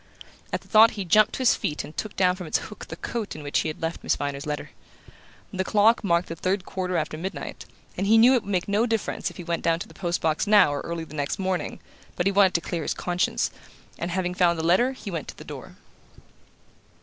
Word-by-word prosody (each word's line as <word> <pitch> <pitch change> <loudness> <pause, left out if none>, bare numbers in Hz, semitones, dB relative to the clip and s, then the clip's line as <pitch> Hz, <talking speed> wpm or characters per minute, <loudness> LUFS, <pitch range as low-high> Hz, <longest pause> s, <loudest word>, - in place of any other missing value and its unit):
At - - -2
the - - -20
thought 220 +1 +7
he 200 - -3
jumped 215 +5 +4
to - - -3
his 255 - +5
feet 150 - -2
and 155 - -11
took 215 - -4
down 180 -1 +3
from 180 -3 -7
its - - +2
hook 210 - -9
the - - -7
coat 230 -4 -4
in 155 - -8
which 145 - 0
he - - -1
had 155 +1 -6
left 165 +1 -2
Miss - - +1
Viner's 140 +1 -4
letter. 150 -1 -4 0.8
The 190 - 0
clock 215 +4 +3
marked 170 -2 +2
the 165 - -5
third 185 +3 -1
quarter 185 -1 -2
after 155 -1 -3
midnight, 190 +4 -6 0.3
and 195 - -1
he 225 +2 +6
knew 240 +4 +7
it 250 - +3
would 205 - -7
make 180 -2 0
no 210 +4 +2
difference 225 -2 -1
if - - -14
he 180 - -6
went 170 0 -2
down 165 0 +2
to 170 - -7
the - - -16
post 175 -2 -2
box 160 +5 0
now 205 -8 +6
or 145 - -3
early 170 -1 -4
the 155 - -12
next 145 +2 -2
morning; 190 -2 -2 0.4
but 175 - -1
he 195 - +3
wanted 195 -2 +4
to 170 - +2
clear 170 -1 -3
his - - -2
conscience, 180 0 0 0.5
and 170 - -2
having 180 0 -1
found 175 -2 +3
the 160 - -3
letter 235 +10 +3
he 215 -6 -8
went 165 -4 -4
to - - -9
the - - -10
door. - - -9
180 Hz, 250 wpm, -25 LUFS, 165-205 Hz, 0.8 s, thought